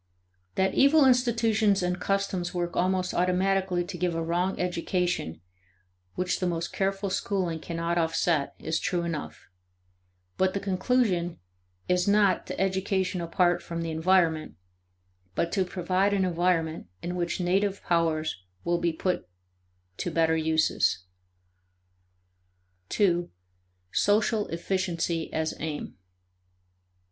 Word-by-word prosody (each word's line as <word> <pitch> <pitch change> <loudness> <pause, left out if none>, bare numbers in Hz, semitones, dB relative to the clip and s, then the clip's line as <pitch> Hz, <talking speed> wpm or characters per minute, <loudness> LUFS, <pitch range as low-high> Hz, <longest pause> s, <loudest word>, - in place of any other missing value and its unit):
That 190 0 +2
evil 280 +1 +5
institutions 230 -5 +3
and 180 0 -1
customs 195 -3 -1
work 175 -1 -2
almost 185 0 +1
automatically 185 0 +1
to 180 0 -6
give 175 -1 0
a 165 - -1
wrong 175 +3 -1
education 175 - -1 0.7
which 180 0 -1
the 185 - 0
most 170 -1 -2
careful 195 0 -1
schooling 185 -4 -1
cannot 170 +1 -2
offset 165 -2 +1
is 160 +1 -2
true 180 -3 -1
enough; 165 -3 -5 0.9
but 190 0 +1
the - - +1
conclusion 190 -3 0 0.5
is 180 +1 +2
not 200 -3 +3
to - - -5
education 190 -1 0
apart 175 +1 +2
from 170 -1 -4
the 165 - -3
environment, 160 - +2 0.8
but 170 - 0
to 195 - +2
provide 185 +2 0
an 190 -1 +2
environment 170 - 0 0.2
in 175 +1 -3
which 175 0 -2
native 195 +3 0
powers 160 - 0 0.2
will 175 0 +1
be 170 -1 +1
put 165 - -2 0.7
to - - -2
better 160 -1 +2
uses. 160 - +1 1.9
2. 175 -4 +2 0.6
Social 210 +1 +2
Efficiency 170 -1 -2
as 160 0 -1
Aim. 155 -2 -4
180 Hz, 120 wpm, -27 LUFS, 170-195 Hz, 1.9 s, evil